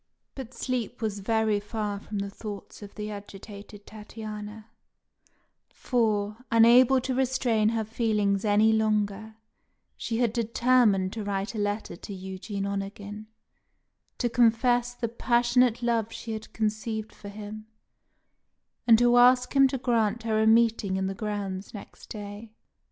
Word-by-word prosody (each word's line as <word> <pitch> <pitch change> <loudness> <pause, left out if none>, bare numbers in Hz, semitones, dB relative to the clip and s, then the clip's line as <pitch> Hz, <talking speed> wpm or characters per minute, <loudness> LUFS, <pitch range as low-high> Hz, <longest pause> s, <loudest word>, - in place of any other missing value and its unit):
But 260 -2 -9
sleep 245 -2 -3
was 215 -3 -3
very 220 0 +1
far 205 -1 -4
from 210 +1 -7
the 200 0 -3
thoughts 205 -1 -9
of 205 -1 -11
the 210 0 -5
agitated 205 0 -10
Tatiana; 215 0 -8 1.0
for, 215 -4 -1
unable 240 +3 +6
to 260 +1 -3
restrain 250 -4 +1
her 225 -1 -1
feelings 210 -3 0
any 215 +1 +4
longer, 215 0 0 0.6
she 225 - -3
had 235 -2 +1
determined 230 -4 +2
to 220 - -4
write 200 +1 -3
a 220 - -4
letter 205 -1 -2
to 200 - -9
Eugene 190 +2 -5
Onegin, 200 +1 -5 0.9
to 245 - 0
confess 240 +1 +2
the 235 - -2
passionate 240 +1 +2
love 230 -2 0
she 225 - -7
had 220 0 -6
conceived 215 0 -3
for 205 - -10
him, 215 +1 -9 1.2
and 230 -1 +8
to 240 +1 +4
ask 250 +2 +5
him 275 -1 +7
to 265 0 -3
grant 230 -3 0
her 220 -1 +1
a 220 - +3
meeting 220 -3 +3
in 190 - -1
the 195 - -2
grounds 200 -1 -5
next 205 - -12
day. 205 +1 -8
220 Hz, 140 wpm, -27 LUFS, 205-235 Hz, 1.2 s, and